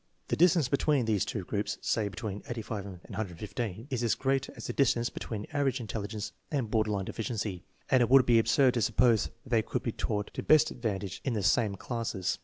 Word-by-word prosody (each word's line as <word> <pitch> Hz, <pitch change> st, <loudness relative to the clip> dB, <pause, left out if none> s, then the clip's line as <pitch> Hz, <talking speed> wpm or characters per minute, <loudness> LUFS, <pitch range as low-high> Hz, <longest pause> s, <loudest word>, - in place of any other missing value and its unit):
The -, -, +2 dB
distance 165 Hz, -4 st, +4 dB
between 140 Hz, -1 st, +2 dB
these 105 Hz, -4 st, +1 dB
two 105 Hz, -, -3 dB
groups 105 Hz, +3 st, -2 dB
(say 110 Hz, -2 st, 0 dB
between 100 Hz, 0 st, -5 dB
85 110 Hz, -4 st, -4 dB
and 95 Hz, -3 st, -9 dB
115) 105 Hz, +2 st, -4 dB
is 125 Hz, -3 st, -1 dB
as 115 Hz, -2 st, +2 dB
great 135 Hz, 0 st, 0 dB
as -, -, -9 dB
the -, -, -3 dB
distance 120 Hz, -3 st, +2 dB
between 105 Hz, -2 st, -5 dB
average 140 Hz, -2 st, +1 dB
intelligence 105 Hz, -1 st, -4 dB, 0.2 s
and 130 Hz, -8 st, -2 dB
border 110 Hz, -1 st, +2 dB
line 100 Hz, -2 st, -1 dB
deficiency, 105 Hz, -5 st, -4 dB, 0.2 s
and 130 Hz, -, +4 dB
it 120 Hz, -, +3 dB
would 135 Hz, -1 st, +7 dB
be 120 Hz, -2 st, +5 dB
absurd 125 Hz, +3 st, +4 dB
to 120 Hz, -, 0 dB
suppose 115 Hz, -1 st, +3 dB
that -, -, -13 dB
they 115 Hz, -2 st, +4 dB
could 110 Hz, -, -3 dB
be 115 Hz, -, -1 dB
taught 105 Hz, -2 st, -3 dB
to -, -, -3 dB
best 155 Hz, 0 st, +5 dB
advantage 100 Hz, -5 st, -3 dB
in 130 Hz, -, -1 dB
the 105 Hz, -3 st, -1 dB
same 105 Hz, 0 st, +2 dB
classes. 105 Hz, -4 st, -3 dB
115 Hz, 210 wpm, -30 LUFS, 105-125 Hz, 0.2 s, would